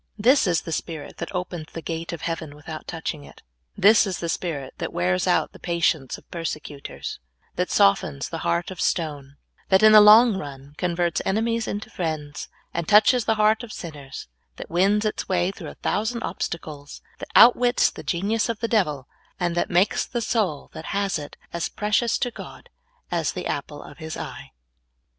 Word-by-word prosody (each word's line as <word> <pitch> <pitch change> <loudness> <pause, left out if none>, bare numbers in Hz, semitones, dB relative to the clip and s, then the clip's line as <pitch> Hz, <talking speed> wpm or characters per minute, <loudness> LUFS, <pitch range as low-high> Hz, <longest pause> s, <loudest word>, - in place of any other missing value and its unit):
This 245 +2 +4
is 170 -2 +2
the 165 - -7
spirit 160 -1 -5
that - - -5
opens 180 -4 -4
the 165 - -5
gate 165 0 -4
of 170 - -6
heaven 165 -3 -4
without 155 +1 -9
touching 160 -3 -4
it. - - -16 0.3
This 215 +1 +6
is 185 - -2
the 170 - -4
spirit 150 -6 -3
that - - -3
wears 90 +1 0
out - - +2
the - - -15
patience 165 -5 0
of - - -19
persecutors, 150 -4 -6 0.4
that - - -1
softens 70 -8 +2
the - - -5
heart 85 - -1
of 185 - -6
stone, 145 -5 -2 0.3
that 190 +2 +4
in 215 - +9
the 215 0 +10
long 215 +1 +8
run 140 -3 -8
converts 175 -2 0
enemies 225 +2 0
into 205 +1 -5
friends, 155 -4 -4 0.3
that 170 -1 -2
touches 215 +3 +5
the 225 - +2
heart 215 +1 +3
of 240 -3 -9
sinners, 145 - -8 0.3
that - - -9
wins 200 +5 +3
its 215 - -2
wa}^ 185 0 0
through - - -8
a - - -11
thousand 225 +3 -1
obstacles, 150 -4 -5 0.2
that - - -8
outwits 245 +1 +6
the - - -9
genius 205 +6 0
of 230 -2 -2
the 230 - -1
devil, 150 - 0 0.3
and 175 -2 0
that 175 - 0
makes 180 +3 +2
the 240 - -3
soul 215 - -1
that 160 - -8
has 195 -4 -1
it 145 -1 -9 0.2
as 170 -1 -2
precious 215 +3 +1
to 245 - -1
God - - -11 0.4
as - - 0
the - - -5
apple - - -4
of - - -13
His 160 0 -6
eye. - - -7
175 Hz, 185 wpm, -24 LUFS, 155-210 Hz, 0.4 s, the